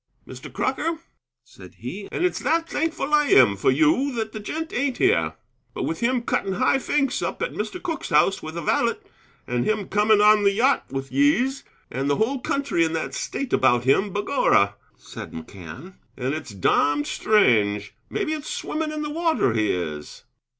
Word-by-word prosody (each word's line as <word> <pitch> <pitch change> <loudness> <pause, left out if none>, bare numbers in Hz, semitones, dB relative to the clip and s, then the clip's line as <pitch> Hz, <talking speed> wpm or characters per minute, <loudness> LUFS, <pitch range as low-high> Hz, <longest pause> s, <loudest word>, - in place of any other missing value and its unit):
"Mr. - - -10
Crocker," 330 0 -1 0.5
said - - -15
he, 200 0 -7
"and 360 - 0
it's 365 - 0
that 330 +4 0
thankful 315 -2 -2
I 295 -1 +4
am 395 - +6
for - - +1
you 300 -3 +3
that 220 -1 -3
the 215 - -6
gent 320 +10 -5
ain't 260 0 -1
here. 80 -1 +2 0.4
But - - -3
with 165 - -3
him 240 0 0
cutting 195 -4 -1
high 255 +7 +2
finks 275 -1 0
up - - -3
at - - -3
Mr. 365 - -4
Cooke's 340 -3 -4
house 165 +5 +3
with 155 +2 -7
a 170 - -4
valet, - - +1 0.5
and 120 0 -1
him 215 -2 -1
coming 210 +1 +3
on 210 0 +6
the 200 0 +4
yacht 255 +7 +2
with 135 0 -5
yese, 275 -2 +2 0.3
and 135 +3 -2
the 145 - +3
whole 255 - 0
country 275 -9 0
in 160 0 -1
that 160 - -3
state 275 - -4
about 120 -2 +3
him, 190 +11 +2
begorra," 205 - +2 0.2
said - - -10
McCann, 90 - -10 0.2
"and 130 +1 -2
it's 155 -3 -5
domned 145 +9 +1
strange! 105 - +2 0.2
Maybe 380 -7 -2
it's 305 -1 -5
swimmin' 310 0 -3
in 305 0 -4
the 300 - -4
water 320 - +1
he 110 -2 +1
is!" 75 -4 -5
210 Hz, 185 wpm, -23 LUFS, -, 0.5 s, am